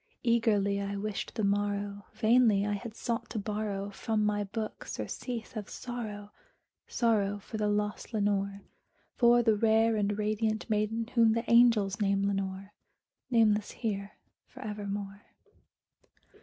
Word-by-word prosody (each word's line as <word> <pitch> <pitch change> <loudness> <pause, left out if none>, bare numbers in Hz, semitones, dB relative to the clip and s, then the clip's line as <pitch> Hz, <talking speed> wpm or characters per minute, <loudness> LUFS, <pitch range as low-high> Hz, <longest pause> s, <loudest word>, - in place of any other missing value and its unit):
Eagerly 210 -4 +2
I 200 0 -3
wished 205 0 -4
the 220 - -1
morrow: 205 0 -1
vainly 220 -2 +4
I 210 - 0
had 215 +2 -6
sought 235 0 -3
to - - -5
borrow 205 -1 -3
From 215 +1 -1
my 205 0 +1
books 215 +2 -5
surcease 240 -2 -5
of 210 -2 -5
sorrow 215 -4 -6 0.6
sorrow 205 -4 +1
for 210 +2 -7
the 210 -1 0
lost 210 +1 -1
Lenore 200 -2 0 0.5
For 240 0 +5
the 225 -1 +4
rare 225 +1 +3
and 205 0 0
radiant 215 +1 -1
maiden 220 +1 0
whom 230 -2 +5
the 230 +1 -2
angels 230 -4 +4
name 200 -1 +2
Lenore 195 0 -3 0.6
Nameless 215 -4 +3
here 205 -3 -4 0.3
for - - -13
evermore. 205 -1 -5
210 Hz, 135 wpm, -30 LUFS, 200-225 Hz, 0.6 s, For